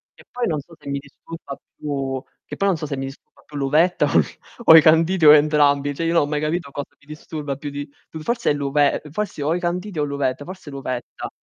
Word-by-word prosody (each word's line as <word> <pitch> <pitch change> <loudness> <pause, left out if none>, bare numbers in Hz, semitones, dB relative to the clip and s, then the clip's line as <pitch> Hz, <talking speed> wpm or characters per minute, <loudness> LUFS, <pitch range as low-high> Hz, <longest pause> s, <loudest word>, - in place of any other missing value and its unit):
E - - -17
poi 245 -1 -2
non 155 -3 -1
so 165 +4 -17
se - - -9
mi 140 0 -2
disturba 145 +1 -10 0.2
più 135 -3 -3 0.2
che - - -7
poi 200 - 0
non 180 - +1
so 155 - -5
se 140 -2 -4
mi 135 - -3
disturba 135 +1 -12
più 145 - -9
l'uvetta 155 +6 +2
o - - +3
i - - +4 0.4
o 160 - +10
i - - +9
canditi 165 +2 +4
o 150 - +11
entrambi. 145 -1 +3
Cioè 165 +4 -3
io 165 - +1
non 165 - +4
ho - - 0
mai 150 0 -2
capito, 155 -1 -2
cosa 145 0 -7
mi - - -25
disturba 150 -2 -6
più 145 0 -6
di 145 0 -6 0.2
più 160 - -8
forse 235 -6 0
l'uve 145 0 +1
ehm, 150 - -13
possi 210 -4 -4
o 155 +3 +1
i - - -1
canditi 180 0 -3
o - - +2
l'uvetta, 140 -1 -2
forse 185 -5 -9
l' - - -11
uvetta. 130 -3 -5
150 Hz, 250 wpm, -22 LUFS, 140-165 Hz, 0.4 s, o